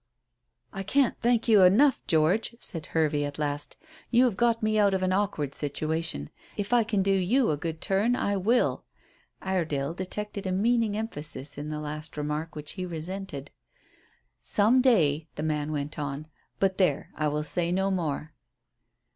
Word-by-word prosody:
"I 195 - -4
can't 270 +6 +2
thank 235 -1 +2
you 215 -4 +6
enough, 225 +10 +5
George," 170 +9 +2
said 165 -9 -5
Hervey 150 -2 +1
at 145 0 -4
last. 145 -1 -3 0.3
"You 245 +1 +5
have 235 -6 +1
got 230 +1 +1
me 215 0 +2
out 200 -2 +4
of 190 - -1
an 185 0 +1
awkward 170 -8 -1
situation. 155 - -1 0.3
If 205 +3 -2
I 240 -1 +5
can 210 -3 0
do 195 - +2
you 195 +5 +2
a - - +1
good 160 +1 -5
turn, 205 +6 +2
I 200 -5 0
will." 220 +6 +1 0.6
Iredale 160 -6 -1
detected 200 +2 -4
a - - -1
meaning 220 +2 +1
emphasis 150 -9 -4
in 145 +1 -6
the 155 0 -4
last 150 +1 -6
remark 150 +2 -3
which 150 0 -5
he 185 - -5
resented. 170 -3 -6 0.9
"Some 225 +5 +4
day," 160 - +3
the 150 - -4
man 155 -1 -1
went 150 0 -4
on; 145 +1 -4 0.3
"but 190 -1 0
there 165 -7 +1
I 155 - -1
will 150 +1 -1
say 170 +2 0
no 190 +2 +1
more." 155 -4 -2
180 Hz, 170 wpm, -27 LUFS, 150-205 Hz, 0.9 s, you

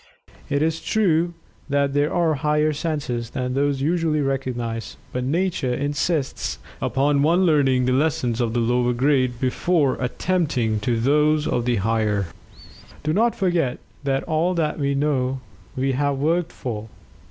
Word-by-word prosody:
It 145 +1 +1
is 160 0 0
true 175 -5 +1 0.3
that 140 -1 +1
there 145 +1 +1
are 170 -2 +2
higher 150 +1 +1
senses 140 -7 -3
than 125 0 -3
those 140 0 0
usually 160 -1 +1
recognized, 125 -5 -3 0.2
but 125 - -1
Nature 150 -3 0
insists 145 +1 -1 0.2
upon 135 +3 +2
one 170 +5 +3
learning 135 -6 +3
the 130 - +1
lessons 130 -4 +1
of 115 -2 0
the - - +2
lower 120 +1 +2
grades 130 0 +2
before 140 +3 +1
attempting 125 -5 0
those 150 +7 +2
of 120 - 0
the 120 -1 +2
higher. 105 -1 0 0.8
Do 155 +1 0
not 230 +5 +2
forget 175 -9 0 0.3
that 135 -1 0
all 165 +3 0
that 155 -2 -1
we 140 -1 0
know 135 -2 0 0.4
we 135 +1 0
have 140 +1 0
"worked 165 +4 0
for." 110 -3 -5
140 Hz, 145 wpm, -23 LUFS, 125-155 Hz, 0.8 s, one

